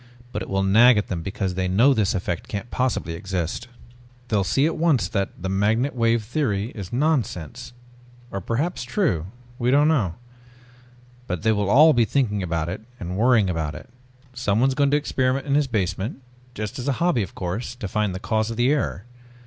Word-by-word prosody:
But 105 - -4
it 95 - -6
will 95 0 0
nag 115 +5 +6
at 105 - -1
them 85 -3 -3
because 95 +1 -3
they 95 0 -1
know 115 +10 +4
this 110 -2 +1
effect 90 -2 -3
can't 100 +3 -5
possibly 125 -9 -1
exist. 95 +4 -3 0.6
They'll 105 -3 +2
see 135 +9 +2
at 160 - 0
once 155 -8 +2
that 100 0 -1
the 95 - -4
magnetic 110 +8 +1
wave 115 -1 +2
theory 110 -3 -1
is 95 -4 -8
nonsense. 125 - -1 0.6
Or 100 - -4
perhaps 140 - -2
true? 120 - 0 0.3
We 120 0 +1
don't 145 +3 +4
know. 115 - +1 1.1
But 90 0 -3
they 110 - +3
will 105 -2 0
all 155 +7 +7
be 120 -2 +3
thinking 110 -6 0
about 85 -3 -2
it 90 +5 -5 0.2
and 90 +1 -5
worrying 115 -1 +4
about 80 -4 -2
it. 120 - -11 0.4
Someone 125 +1 +1
is - - 0
going 140 +1 +2
to 145 - +3
experiment 130 -2 0
in 140 - -1
his 145 -1 +3
basement 105 +2 -2 0.3
just 105 +2 -5
as 125 - -5
a 140 - +2
hobby 170 -3 +1
of 95 - -5
course 100 +7 -4
to 115 -5 -5
find 105 -1 -1
the - - -4
cause 110 +1 0
of 115 - -5
the 120 +3 +3
error. 140 -8 -1
110 Hz, 195 wpm, -23 LUFS, 95-130 Hz, 1.1 s, all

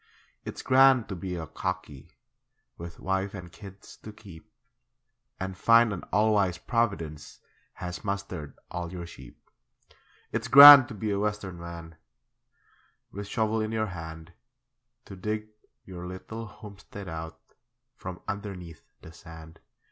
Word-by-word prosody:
It's - - -7
grand 130 -2 +5
to 100 - -4
be 90 0 -5
a 80 -2 -5
'cockie' 95 -3 -6 0.7
With 85 0 -10
wife 95 +1 -2
and 90 -3 -9
kids 95 +1 -13
to 110 - -11
keep, 105 -1 -15 0.9
And 95 0 -4
find 115 +2 +4
an 90 - -6
all 110 +1 +3
wise 95 -4 +1
Providence 90 -9 -3 0.3
Has 90 -1 -7
mustered 95 -7 -5
all 90 -1 -5
your 90 -2 -6
sheep. 65 -7 -13 0.9
It's 115 +1 -3
grand 140 0 +11
to 110 - -9
be 105 +1 -3
a 100 - -1
Western 105 -4 -3
man, 85 -1 -9 1.1
With 100 +1 -7
shovel 110 +1 0
in 110 0 -3
your 110 -1 0
hand, 80 0 -9 0.7
To 95 - -10
dig 105 +3 -4 0.4
your 90 -2 -8
little 110 +5 -8
homestead 100 -1 -11
out 80 0 -7 0.6
From 90 -5 -8
underneath 95 -5 -7 0.2
the 80 - -12
sand. 80 -1 -13
95 Hz, 135 wpm, -27 LUFS, 85-105 Hz, 1.1 s, grand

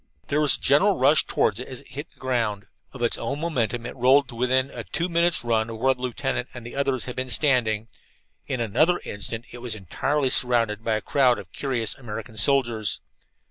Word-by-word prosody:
There 150 +2 +2
was 150 - +3
a - - -24
general 170 +9 +4
rush 140 +4 +4
toward 105 +1 +1
it 125 - -6
as 130 -2 -5
it - - -20
hit 145 +3 -7
the - - -25
ground. 115 -6 -1 0.3
Of 125 -3 -6
its 120 - 0
own 135 +5 -3
momentum 120 -7 -1
it - - -6
rolled 130 +2 +4
to - - -9
within 130 +2 +1
a - - -6
two 170 - -2
minutes' 170 -4 +2
run 115 -1 +1
of 115 - -6
where 130 +4 +3
the 125 - -15
lieutenant 125 0 -2
and 120 -2 -8
the 120 - -8
others 135 -3 0
had 125 - -6
been 130 0 -3
standing. 120 -6 +2 0.6
In 130 - -2
another 155 - +2
instant 110 +3 -4
it 120 - -9
was 120 -2 -5
entirely 130 - -1
surrounded 115 -4 +2
by 110 -1 +1
a 110 - -2
crowd 130 -1 +3
of 95 - -10
curious 125 -6 -1
American 115 -2 -8
soldiers. 115 -2 +2
125 Hz, 215 wpm, -24 LUFS, 115-140 Hz, 0.6 s, general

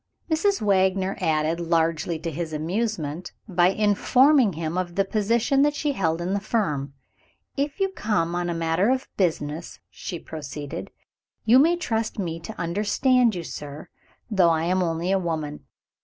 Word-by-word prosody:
Mrs. 390 - +2
Wagner 190 -1 +2
added 155 +1 +1
largely 165 -1 0
to 165 +1 -4
his 160 +1 -4
amazement, 170 -1 -2
by 175 -3 +3
informing 215 +5 +4
him 160 +1 -3
of 180 -1 -2
the 195 0 +2
position 230 +7 +1
that 295 +1 +3
she 295 0 0
held 165 - 0
in 180 +3 -1
the 200 - +1
firm. 150 - -1 0.6
"If 285 +4 -2
you 390 0 +2
come 205 - -1
on 175 0 -1
a 170 - -2
matter 165 +5 +1
of 260 +1 0
business," 160 -3 -2
she 175 - -6
proceeded, 150 -3 -7 0.6
"you 240 +4 +7
may 330 +5 +5
trust 225 -10 -2
me 170 -5 -3
to 215 +6 -9
understand 215 - +2
you, 175 - -4
sir, 145 -1 -8 0.4
though 190 -6 +4
I 160 -1 +1
am 185 +2 +1
only 170 +1 -1
a 195 - +3
woman. 155 -4 -4
180 Hz, 160 wpm, -24 LUFS, 165-220 Hz, 0.6 s, you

